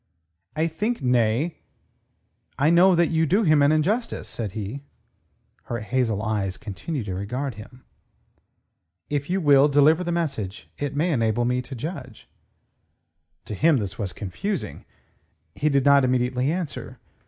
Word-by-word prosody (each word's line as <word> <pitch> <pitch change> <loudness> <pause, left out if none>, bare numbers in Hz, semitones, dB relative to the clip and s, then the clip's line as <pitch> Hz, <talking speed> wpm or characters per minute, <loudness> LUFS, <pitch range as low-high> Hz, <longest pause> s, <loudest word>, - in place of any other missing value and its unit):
"I 160 +1 +1
think..., 205 - -2
nay, 125 +5 +1 1.0
I 145 +4 +3
know 180 +2 +6
that 170 -1 +2
you 160 0 +2
do 200 +8 +3
him 155 -5 +4
an 140 +1 +5
injustice," 205 +10 0
said 105 -5 -5
he. 110 +5 -5 0.8
Her 120 -2 -4
hazel 110 -2 -1
eyes 100 -4 -2
continued 115 - -5
to 95 - -4
regard 125 +8 -3
him. 110 +5 -13 1.3
"If 145 +1 -2
you 190 +2 +1
will 145 -4 +5
deliver 150 +4 +4
the 175 - -2
message, 135 - -3
it 145 -1 -3
may 165 +4 +1
enable 115 -1 +1
me 125 +1 0
to 130 +1 -9
judge." 130 - -7 1.2
To - - -6
him, 155 +7 +3
this 100 -4 -4
was 100 -4 -2
confusing. 105 - -5 0.7
He 150 - 0
did 140 -2 +2
not 140 -1 +6
immediately 125 +2 +1
answer. 170 -4 -5
140 Hz, 145 wpm, -24 LUFS, 115-160 Hz, 1.3 s, know